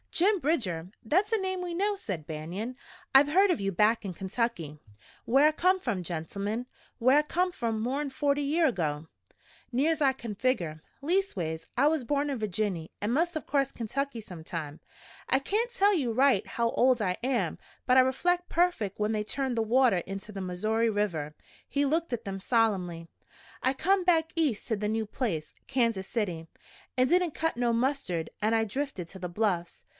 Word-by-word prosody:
"Jim 395 Hz, +3 st, +3 dB
Bridger? 200 Hz, -, -1 dB
That's 370 Hz, -, +2 dB
a 450 Hz, -, +3 dB
name 375 Hz, -2 st, -2 dB
we 350 Hz, -1 st, -4 dB
know," 405 Hz, +4 st, +1 dB
said 185 Hz, -, -5 dB
Banion. 175 Hz, +10 st, -5 dB, 0.4 s
"I've 280 Hz, +2 st, +7 dB
heard 385 Hz, +6 st, +5 dB
of 350 Hz, -, +1 dB
you 195 Hz, 0 st, 0 dB
back 215 Hz, +5 st, +3 dB
in 195 Hz, -3 st, -4 dB
Kentucky." 190 Hz, -5 st, -3 dB, 0.5 s
"Whar 270 Hz, +5 st, +5 dB
I 305 Hz, -, +6 dB
come 365 Hz, +4 st, +2 dB
from, 225 Hz, -, -2 dB
gentlemen 200 Hz, +8 st, -3 dB, 0.3 s
whar 255 Hz, +4 st, +5 dB
I -, -, +6 dB
come 360 Hz, +4 st, 0 dB
from 230 Hz, -8 st, -2 dB
more'n 275 Hz, +6 st, -1 dB
forty 285 Hz, +1 st, 0 dB
year 310 Hz, +4 st, +2 dB
ago, 160 Hz, -, -2 dB, 0.6 s
near's 300 Hz, +6 st, +1 dB
I 270 Hz, -2 st, +4 dB
can 230 Hz, -5 st, -7 dB
figger. 185 Hz, -11 st, -1 dB, 0.2 s
Leastways 200 Hz, -, -1 dB
I 280 Hz, +4 st, +5 dB
was 310 Hz, -3 st, +1 dB
borned 285 Hz, +4 st, 0 dB
in 265 Hz, -, -3 dB
Virginny 195 Hz, -5 st, -2 dB
an' 205 Hz, +2 st, -1 dB
must 335 Hz, +6 st, +1 dB
of 315 Hz, -, -3 dB
crossed 275 Hz, -2 st, 0 dB
Kentucky 245 Hz, +2 st, -3 dB
sometime. 165 Hz, -5 st, -7 dB, 0.5 s
I 265 Hz, -, +4 dB
kain't 440 Hz, -, -1 dB
tell 410 Hz, -4 st, +3 dB, 0.2 s
right 260 Hz, -4 st, +4 dB
how 235 Hz, 0 st, 0 dB
old 250 Hz, -2 st, +3 dB
I 185 Hz, -3 st, 0 dB
am, 255 Hz, -1 st, 0 dB, 0.3 s
but 255 Hz, -, +4 dB
I -, -, +9 dB
rek'lect 350 Hz, +8 st, +1 dB
perfect 335 Hz, -, +1 dB
when 210 Hz, +1 st, +1 dB
they 210 Hz, -1 st, 0 dB
turned 260 Hz, +3 st, -2 dB
the -, -, +3 dB
water 245 Hz, -2 st, +4 dB
inter 195 Hz, +4 st, -7 dB
the 195 Hz, -, -5 dB
Missoury 215 Hz, +5 st, 0 dB
River." 170 Hz, -8 st, -1 dB, 0.3 s
He 285 Hz, 0 st, +1 dB
looked 320 Hz, +2 st, 0 dB
at 240 Hz, -, -3 dB
them 195 Hz, -1 st, -4 dB
solemnly. 190 Hz, -7 st, 0 dB, 0.6 s
"I 260 Hz, -, +3 dB
come 380 Hz, +7 st, +2 dB
back 330 Hz, -3 st, +2 dB
East 300 Hz, -10 st, +1 dB
to 225 Hz, -, +1 dB
the 210 Hz, 0 st, -2 dB
new 220 Hz, 0 st, 0 dB
place, 195 Hz, -, -3 dB
Kansas 230 Hz, -7 st, 0 dB
City. 175 Hz, -8 st, -2 dB, 0.5 s
It 255 Hz, -, +5 dB
didn't 355 Hz, +3 st, +2 dB
cut 325 Hz, +2 st, -1 dB
no 240 Hz, 0 st, +1 dB
mustard, 230 Hz, -, 0 dB
an' 215 Hz, +2 st, +2 dB
I 225 Hz, 0 st, +3 dB
drifted 240 Hz, -, -4 dB
to 190 Hz, -, -10 dB
the 180 Hz, -1 st, -4 dB
Bluffs. 175 Hz, -3 st, -1 dB
235 Hz, 185 wpm, -29 LUFS, 195-290 Hz, 0.6 s, I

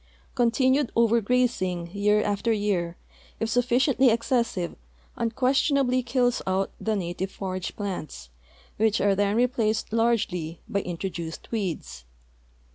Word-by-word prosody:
Continued 260 Hz, +2 st, +2 dB
over 235 Hz, 0 st, +4 dB
grazing 195 Hz, -8 st, 0 dB
year 210 Hz, +1 st, +3 dB
after 205 Hz, +3 st, 0 dB
year, 195 Hz, -5 st, 0 dB, 0.4 s
if 225 Hz, -, -1 dB
sufliciently 250 Hz, +2 st, +3 dB
excessive, 230 Hz, -6 st, 0 dB, 0.4 s
unquestion 260 Hz, +5 st, +1 dB
ably 255 Hz, -2 st, +2 dB
kills 245 Hz, 0 st, +1 dB
out 190 Hz, +1 st, 0 dB
the 220 Hz, -1 st, 0 dB
native 185 Hz, 0 st, -3 dB
forage 185 Hz, -2 st, -5 dB
plants, 175 Hz, -, -5 dB, 0.5 s
Avhich 220 Hz, 0 st, +3 dB
are 200 Hz, 0 st, +3 dB
then 200 Hz, +1 st, +1 dB
replaced 230 Hz, -3 st, +1 dB
largely 210 Hz, -8 st, 0 dB
by 200 Hz, -, 0 dB
introduced 170 Hz, -2 st, -5 dB
weeds. 170 Hz, -, -4 dB
215 Hz, 120 wpm, -26 LUFS, 185-240 Hz, 0.5 s, over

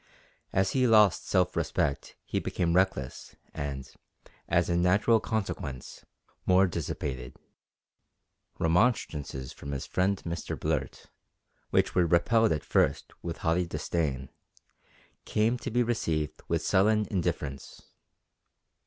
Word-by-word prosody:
As 95 Hz, 0 st, +2 dB
he 130 Hz, -2 st, +2 dB
lost 105 Hz, -7 st, +5 dB
self -, -, +2 dB
respect 70 Hz, -, -1 dB
he -, -, -1 dB
became 85 Hz, -2 st, -1 dB
reckless 90 Hz, -9 st, 0 dB, 0.2 s
and, 70 Hz, -2 st, -4 dB, 0.6 s
as 85 Hz, +1 st, +3 dB
a 85 Hz, -, +1 dB
natural 100 Hz, +6 st, +4 dB
consequence, 90 Hz, -, -4 dB, 0.4 s
more 95 Hz, +1 st, +6 dB
dissipated. 70 Hz, -7 st, -4 dB, 1.2 s
Remonstrances 80 Hz, -, 0 dB
from 70 Hz, 0 st, -7 dB
his 70 Hz, -, -4 dB
friend 95 Hz, +1 st, 0 dB
Mr 85 Hz, 0 st, -4 dB
Blurt, -, -, -3 dB, 0.6 s
which -, -, +2 dB
were 90 Hz, -2 st, +3 dB
repelled 110 Hz, +7 st, +3 dB
at 75 Hz, -2 st, -1 dB
first -, -, +1 dB
with 85 Hz, -1 st, -5 dB
haughty 85 Hz, +2 st, +2 dB
disdain, 70 Hz, -6 st, -2 dB, 1.0 s
came 115 Hz, +3 st, +1 dB
to 130 Hz, -, -4 dB
be 120 Hz, +1 st, +2 dB
received 80 Hz, -11 st, -1 dB
with -, -, -1 dB
sullen 105 Hz, +3 st, +3 dB
indifference. 70 Hz, -7 st, -3 dB
85 Hz, 115 wpm, -29 LUFS, 75-105 Hz, 1.2 s, more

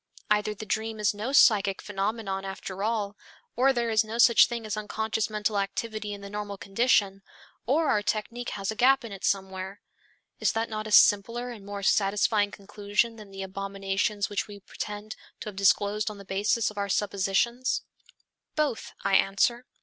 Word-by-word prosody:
Either 210 Hz, 0 st, +2 dB
the 215 Hz, -, -8 dB
dream 220 Hz, +1 st, -2 dB
is 210 Hz, -1 st, +2 dB
no 215 Hz, +6 st, -4 dB
psychic 205 Hz, -8 st, +5 dB
phenomenon 200 Hz, -1 st, -3 dB
after 195 Hz, 0 st, -6 dB
all, 210 Hz, -2 st, -1 dB, 0.4 s
or 265 Hz, +3 st, +4 dB
there 240 Hz, -3 st, -1 dB
is 220 Hz, 0 st, +4 dB
no 220 Hz, +1 st, -6 dB
such 235 Hz, -1 st, +7 dB
thing 235 Hz, -2 st, -5 dB
as 215 Hz, -, -3 dB
unconscious 220 Hz, +1 st, -2 dB
mental 210 Hz, -1 st, 0 dB
activity 210 Hz, +2 st, -3 dB
in 200 Hz, -1 st, -7 dB
the 200 Hz, -, -8 dB
normal 205 Hz, -1 st, -5 dB
condition, 195 Hz, -1 st, +1 dB, 0.5 s
or 305 Hz, +5 st, +2 dB
our 210 Hz, -, +2 dB
technique 230 Hz, +3 st, -3 dB
has 195 Hz, 0 st, -3 dB
a -, -, -6 dB
gap 260 Hz, +2 st, +4 dB
in 225 Hz, -, -8 dB
it 195 Hz, -1 st, -9 dB
somewhere. 190 Hz, 0 st, -2 dB, 0.6 s
Is -, -, +2 dB
that 225 Hz, +1 st, -1 dB
not 215 Hz, -1 st, -4 dB
a -, -, -7 dB
simpler 230 Hz, +5 st, +4 dB
and 220 Hz, -4 st, -10 dB
more 200 Hz, 0 st, -6 dB
satisfying 205 Hz, +1 st, +2 dB
conclusion 205 Hz, +3 st, -2 dB
than 210 Hz, -2 st, -11 dB
the 195 Hz, 0 st, -6 dB
abominations 195 Hz, +1 st, -2 dB
which 205 Hz, -, -2 dB
we 205 Hz, -1 st, -10 dB
pretend 210 Hz, +1 st, -6 dB, 0.3 s
to -, -, -4 dB
have 205 Hz, -, -11 dB
disclosed 205 Hz, +2 st, +2 dB
on 210 Hz, -, -8 dB
the 200 Hz, -, -11 dB
basis 210 Hz, +4 st, +1 dB
of 210 Hz, -, -7 dB
our 200 Hz, 0 st, -2 dB
suppositions?" 205 Hz, +6 st, 0 dB, 0.7 s
Both, 295 Hz, -6 st, -1 dB
I -, -, 0 dB
answer. 235 Hz, +5 st, +1 dB
210 Hz, 180 wpm, -27 LUFS, 200-225 Hz, 0.7 s, such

